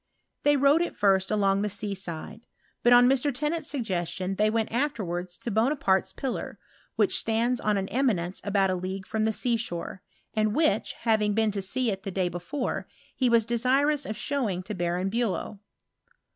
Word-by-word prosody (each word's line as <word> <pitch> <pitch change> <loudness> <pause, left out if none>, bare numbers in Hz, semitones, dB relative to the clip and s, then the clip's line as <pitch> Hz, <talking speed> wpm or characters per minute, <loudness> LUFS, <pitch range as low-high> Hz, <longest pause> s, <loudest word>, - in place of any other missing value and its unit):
They 290 0 +4
rode 280 +4 +4
at 345 - -2
first 195 -2 +3
along 200 -2 +2
the 210 - 0
sea 205 +1 -4
side; 190 +4 -6 0.3
but, 240 - +4
on 245 0 +8
Mr. 270 +2 +2
Tennant's 300 +4 -2
suggestion, 185 - -2
they 210 +2 +2
went 225 0 -1
afterwards 185 - -2
to 235 - -5
Bo 220 +5 +3
naparte's 195 -11 +1
pillar, 265 -2 -4 0.4
which - - +3
stands 235 +2 0
on 210 -1 +1
an 195 0 -2
eminence 200 -9 0
about 195 -2 +2
a - - 0
league 190 +1 -5
from 220 +1 -1
the 220 - +2
sea 235 +2 0
shore, 185 -4 -5 0.3
and 215 0 +1
which, 295 -10 +2
having 215 -3 +2
been 220 -1 +2
to 200 -1 -3
see 240 +5 0
it 195 -1 -4
the 195 - -5
day 185 -1 0
before, 175 - -4 0.3
he 255 -2 +2
was 230 -2 +4
desirous 265 +5 +1
of 215 - -4
showing 225 -12 -1
to 210 +3 -5
Baron 175 +1 -1
Bulow. 220 -2 -2
215 Hz, 185 wpm, -27 LUFS, 190-245 Hz, 0.4 s, on